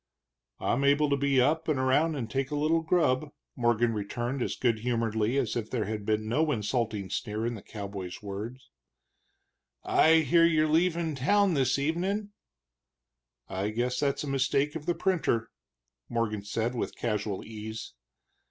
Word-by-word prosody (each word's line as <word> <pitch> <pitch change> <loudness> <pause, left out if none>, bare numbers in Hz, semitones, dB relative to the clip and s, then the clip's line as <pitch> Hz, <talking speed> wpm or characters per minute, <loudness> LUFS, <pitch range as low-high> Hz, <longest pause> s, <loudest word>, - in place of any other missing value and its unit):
"I'm 135 - 0
able 145 +1 +3
to - - +4
be 140 -1 +2
up 155 +6 +2
and 155 -3 +1
around 140 +5 +2
and 125 -5 -3
take 135 +2 -2
a 150 - -3
little 155 +3 +2
grub," 160 -5 +1 0.3
Morgan 120 -1 +2
returned, 120 +5 -3
as - - -1
good 115 -3 +1
humoredly 115 0 0
as 130 -5 0
if 115 -2 -3
there 115 -5 -1
had 105 0 -4
been 110 0 0
no 150 +7 +1
insulting 105 -4 -1
sneer 105 +1 -2
in 120 - -1
the 110 - -8
cowboy's 100 -4 -7
words. 115 +6 -7 1.1
"I 160 0 +5
hear 165 +3 +4
you're 155 -2 +4
leaving 165 0 +1
town 195 +8 +3
this 135 -3 +2
evenin'?" 185 +8 -1 1.2
"I 95 +2 -2
guess 125 +3 -1
that's 140 0 0
a - - -5
mistake 135 +2 +1
of 160 0 -6
the 175 - +1
printer," 160 -12 0 0.6
Morgan 115 -3 -1
said 115 +4 -2
with 120 - -3
casual 105 -4 -2
ease. 110 0 -7
125 Hz, 160 wpm, -29 LUFS, 110-150 Hz, 1.2 s, I